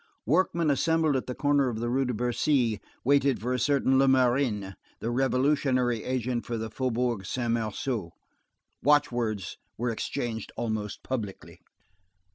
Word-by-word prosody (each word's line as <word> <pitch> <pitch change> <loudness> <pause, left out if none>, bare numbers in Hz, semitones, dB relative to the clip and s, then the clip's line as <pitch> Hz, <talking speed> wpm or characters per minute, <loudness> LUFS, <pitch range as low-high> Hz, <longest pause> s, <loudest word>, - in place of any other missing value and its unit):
_ - - -33 0.2
Workmen 165 - +2
assembled 160 +1 +2
at 130 - -2
the 125 - -4
corner 145 -2 +2
of 115 - -4
the 120 +1 -2
Rue 130 +3 +1
de 125 - -1
Bercy, 120 -1 +1 0.2
waited 140 -2 +3
for 125 +5 -2
a 125 - 0
certain 135 -2 +3
Lemarin, 125 -6 +2 0.3
the 115 - -2
revolutionary 130 -2 +1
agent 125 -1 -1
for 120 - -3
the 110 -1 -4
Faubourg 125 -4 -1
Saint 120 +4 -2
Marceau. 110 -3 -2 0.7
Watchwords 120 - +1 0.2
were 120 +1 -1
exchanged 110 0 -4
almost 110 -3 -3
publicly. 110 -7 -5
125 Hz, 140 wpm, -28 LUFS, 115-135 Hz, 0.7 s, waited